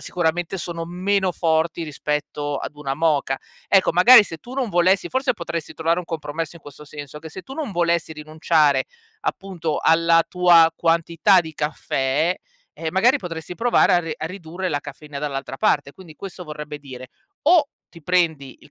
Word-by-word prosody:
sicuramente, 175 +2 -2
sono 170 -1 -5
meno 185 +2 0
forti 165 0 0
rispetto 150 -1 -3
ad - - -6
una 140 -2 -3
moka. 145 -3 +1 0.3
Ecco, 190 -4 +4
magari, 220 +7 +8
se 165 -3 -8
tu 245 +10 -12
non 265 -3 -1
volessi 185 0 +2
forse 260 +2 0
potresti 170 -5 -6
trovare 165 +2 0
un - - -9
compromesso 160 0 -5
in 160 - -17
questo 145 +1 -12
senso: 145 0 -9
che 160 +1 -10
se 185 +4 -9
tu 265 - -11
non 290 -7 -4
volessi 170 -2 0
rinunciare, 155 -1 +1 0.4
appunto, 190 - -3
alla 165 0 +4
tua 175 -2 +5
quantità 170 +3 +3
di 160 -2 -8
caffè, 150 +2 -1 0.4
ehm, 160 - -5
magari, 235 - +3
potresti 170 - -7
provare 230 -2 +3
a 175 - +5
re 165 -2 -5
a 155 - -4
ridurre 180 +1 -5
la 145 -4 -1
caffeina 150 -2 -9
dall'altra 135 -2 -4
parte. 140 0 +1
Quindi 175 -5 -14
questo 190 -2 -8
vorrebbe 150 -2 -7
dire: 130 -3 -10 0.3
o 315 -2 +4 0.2
ti 165 -3 -16
prendi 160 -6 0
il - - -19
165 Hz, 175 wpm, -22 LUFS, 150-180 Hz, 0.4 s, magari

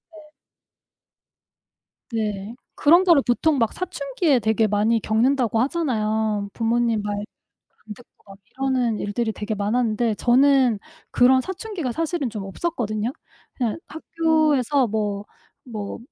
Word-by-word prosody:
예. 305 -1 -15 1.8
네. 215 -1 -3 0.2
그런 340 +5 +5
거를 340 -7 +5
보통 280 +4 +2
막 230 -3 +1
사춘기에 295 -5 0
되게 220 0 +1
많이 215 +3 +2
겪는다고 230 +1 +1
하잖아요. 220 -8 -1
부모님 230 -1 +1
말 205 0 -3 0.6
안 210 -1 -8
듣고 245 - -19 0.2
막 195 - -12
이러는 255 -4 0
일들이 220 +2 -2
되게 210 +1 -4
많았는데 220 +2 0
저는 255 0 +3 0.3
그런 260 +1 +5
사춘기가 380 - -5
사실은 320 -1 -2
좀 210 -3 -6
없었거든요? 215 - -3 0.4
그냥 240 -5 -1
학교에서 310 -5 +1
뭐, 205 -2 -2 0.4
뭐 215 -5 -6
240 Hz, 260 characters per minute, -23 LUFS, 215-280 Hz, 1.8 s, 그런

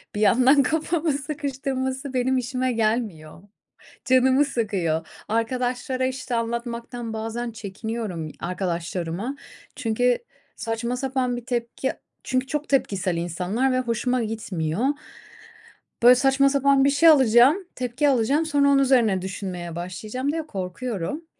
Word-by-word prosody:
bir 210 - -2
yandan 255 +7 +5
kafamı 320 +1 0
sıkıştırması 275 -2 -3
benim 260 +1 +1
işime 255 0 -1
gelmiyor, 215 -8 -2 0.6
canımı 260 +2 +4
sıkıyor. 185 - -1 0.2
Arkadaşlara, 250 +3 -1
işte, 255 -1 -3
anlatmaktan 235 0 -4
bazen 225 +2 -4
çekiniyorum, 210 -5 -5
arkadaşlarıma. 180 +5 -3 0.4
Çünkü 245 +2 +1 0.4
saçma 235 +2 -3
sapan 255 -2 -1
bir 240 - -8
tepki 240 +1 -2 0.3
Çünkü 255 +1 0
çok 300 +1 -3
tepkisel 195 -10 +1
insanlar 180 +10 -1
ve 255 - +2
hoşuma 245 0 0
gitmiyor. 205 -2 -2 1.2
Böyle, 250 +1 +9
saçma 270 +2 +3
sapan 275 -1 +3
bir - - +5
şey 305 +4 +5
alacağım, 260 - +6 0.2
tepki 255 +3 0
alacağım, 275 +6 +2
sonra 285 -2 +3
onun 275 -1 +5
üzerine 235 -8 +3
düşünmeye 180 -3 -5
başlayacağım 215 +10 -4
diye 320 -1 -4
korkuyorum. 200 - -4
245 Hz, 120 wpm, -24 LUFS, 215-265 Hz, 1.2 s, Böyle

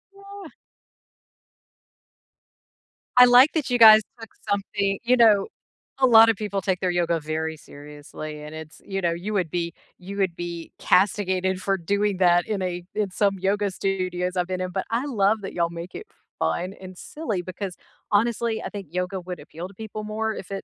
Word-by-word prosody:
Ah. 395 -3 -11 2.7
I 250 - +10
like 250 +4 +7
that 310 -6 -1
you 245 - +2
guys 220 -1 +9 0.2
took 225 - -10 0.2
something 200 -1 -1
You 250 +1 +3
know, 215 -4 +5 0.5
a 260 - +5
lotta 225 -2 +7
people 200 -1 -3
take 190 -2 -1
their 185 - 0
yoga 170 -1 0
very 160 +1 -3
seriously, 150 +1 -10
and 150 +1 -9
it's 155 -1 -10
you 195 -1 -3
know, 170 -1 +1
you 185 +6 -4
would 180 -5 0
be 170 -1 -2 0.2
you 195 +2 -9
would 185 -4 0
be 170 -1 -6
castigated 190 -1 +1
for 195 -1 0
doing 200 +3 0
that 175 -1 +3
in 205 -3 -2
a 180 -1 -3
in 205 -3 -1
some 195 0 +1
yoga 200 +2 0
studios 185 -1 -2
I've 180 0 0
been 185 0 -3
in 185 0 -3
but 190 - -3
I 235 +5 -1
love 215 -4 +1
that 195 - -7
y'all 170 -1 0
make 170 +1 -8
it - - -8 0.3
fun 80 - -1
and 185 -1 -11
silly 225 - -4
because, 185 +1 -6 0.4
honestly, 230 +1 +1
I - - -4
think 200 -5 -8
yoga 180 +1 -2
would 180 -2 -7
appeal 165 +4 -8
to 200 - -16
people 215 +1 -7
more 220 +1 -2
if 195 - -9
it 195 - -4
190 Hz, 185 wpm, -24 LUFS, 175-215 Hz, 2.7 s, I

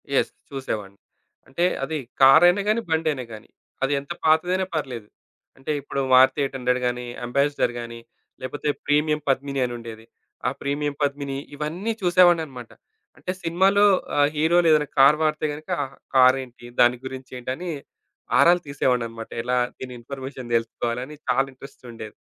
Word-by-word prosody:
Yes. - - +2 0.2
చూసేవాడిని. 105 -8 -5 0.5
అంటే 170 +6 0 0.2
అది 155 +3 -2 0.2
కారైయినా 170 +8 +7
గానీ, 220 +2 +2
బండైయినా 160 -5 0
గానీ 110 - -11 0.3
అది 135 +2 +1
ఎంత 140 - -11
పాతదైనా 175 +4 +2
పర్లేదు. 125 -8 -4 0.5
అంటే 135 +3 -4
ఇప్పుడు 140 - -4
మారుతి 130 +2 +6
ఎయిట్ 135 - -3
హండ్రెడ్ 125 0 0
గానీ, 125 0 -3 0.2
అంబాసిడర్ 140 0 +1
గానీ, 115 0 -7 0.4
లేకపోతే 145 +3 -3 0.2
ప్రీమియం 150 +1 +2
పద్మిని 140 +1 0
అని 120 - -4
ఉండేది. 115 -1 -10 0.4
ఆ - - +4
ప్రీమియం 145 +1 -2
పద్మిని 140 -1 -2 0.2
ఇవన్నీ 165 +9 -3
చూసేవాడినన్నమాట. 170 -9 +3 0.5
అంటే 185 - -4
సినిమాలో 190 +5 +3 0.3
ఆహ్, 145 0 +4
హీరోలు 165 +3 +3
ఏదైనా 150 -1 +3
కార్ 140 +3 +7
వాడితే 155 0 0
గనక 155 +1 -11 0.5
కారేంటి, 130 -1 +3
దాని 120 +1 +5
గురించేంటని 130 +4 -6 0.7
ఆరాలు 175 +1 +5
తీసేవాన్నన్నమాట. 120 -5 -1
ఎలా 125 +1 0 0.2
దీని 130 -1 -8
ఇన్ఫర్మేషన్ 130 0 -8
తెలుసుకోవాలని 120 +4 -2
చాలా 135 +2 +3
ఇంట్రెస్ట్ 135 +1 -14
ఉండేది. 110 -2 -9
135 Hz, 135 wpm, -23 LUFS, 125-155 Hz, 0.7 s, కారైయినా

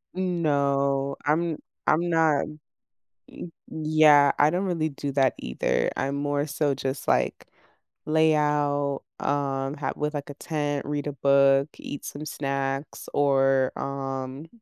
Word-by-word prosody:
No, 140 -6 0
I'm 160 +2 +1 0.3
I'm 170 +3 +2
not 160 -3 +3 0.8
Y - - -9 0.2
yeah, 155 -2 +5
I 145 +1 +5
don't 180 +4 -1
really 165 -4 -1
do 140 0 -5
that 135 -1 +2
either. 60 - -1
I'm 140 +1 -1
more 145 0 -1
so 145 -1 0
just, 135 0 -4
like, - - +1 0.6
lay 160 0 +3
out, 145 -2 0 0.2
um, 135 -1 -1
ha 140 -3 -3
with, 150 0 -2
like, 145 0 -5
a - - -8
tent, 145 -2 -3
read 145 -1 -2
a 145 - -3
book, 140 +1 +4
eat 145 - -7
some 150 +2 -6
snacks 140 -1 -3
or, 135 -2 +3
um, 135 +1 -5
145 Hz, 135 wpm, -26 LUFS, 140-155 Hz, 0.8 s, yeah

